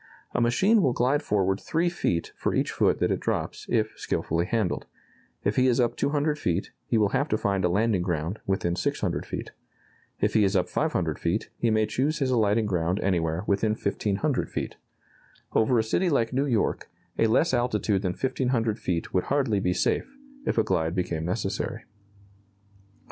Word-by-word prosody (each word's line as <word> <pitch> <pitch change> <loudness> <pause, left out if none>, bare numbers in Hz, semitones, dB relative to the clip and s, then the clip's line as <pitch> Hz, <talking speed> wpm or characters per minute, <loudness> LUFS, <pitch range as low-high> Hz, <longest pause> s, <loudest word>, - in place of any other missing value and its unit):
A - - +1
machine 190 - +4
will 130 -8 +2
glide 130 +5 +2
forward 95 -5 0
3 165 +2 0
feet 90 - -1
for - - -1
each - - +1
foot - - +2
that - - +1
it - - 0
drops, - - -3
if 110 -2 +1
skilfully 85 +2 -1
handled. 110 -5 -1 0.6
If 100 +1 0
he 130 0 +4
is 125 0 +2
up 120 -2 +2
200 150 +1 0
feet, 90 +2 -1 0.2
he 115 - +2
will 105 -2 +3
have 140 +8 0
to 110 - +2
find 100 -2 0
a 90 - +3
landing 105 +1 +2
ground 85 +2 -2
within 90 -3 0
600 90 - -2
feet. - - -5 0.7
If - - +1
he 110 - +4
is 100 0 +2
up 90 -1 +2
500 - - -1
feet, - - -1
he 115 - 0
may 110 0 +3
choose 135 +8 0
his 135 -4 0
alighting 110 -2 +2
ground 90 -1 0
anywhere 85 -2 0
within 105 +2 +1
1,500 110 +6 -1
feet. - - -4 0.8
Over 115 +3 +3
a 110 - +3
city 175 +11 +1
like 125 -6 +1
New 135 +3 +1
York, 115 -6 0 0.3
a 115 - +4
less 130 +7 +2
altitude 110 -5 +1
than 90 -3 -1
1,500 125 -2 0
feet 85 -2 -2
would 90 - +1
hardly 135 -7 +1
be 90 - +1
safe, 270 - -1 0.3
if - - 0
a 110 - +4
glide 80 -3 0
became 85 -3 -2
necessary. 90 - -2
110 Hz, 180 wpm, -26 LUFS, 95-125 Hz, 0.8 s, machine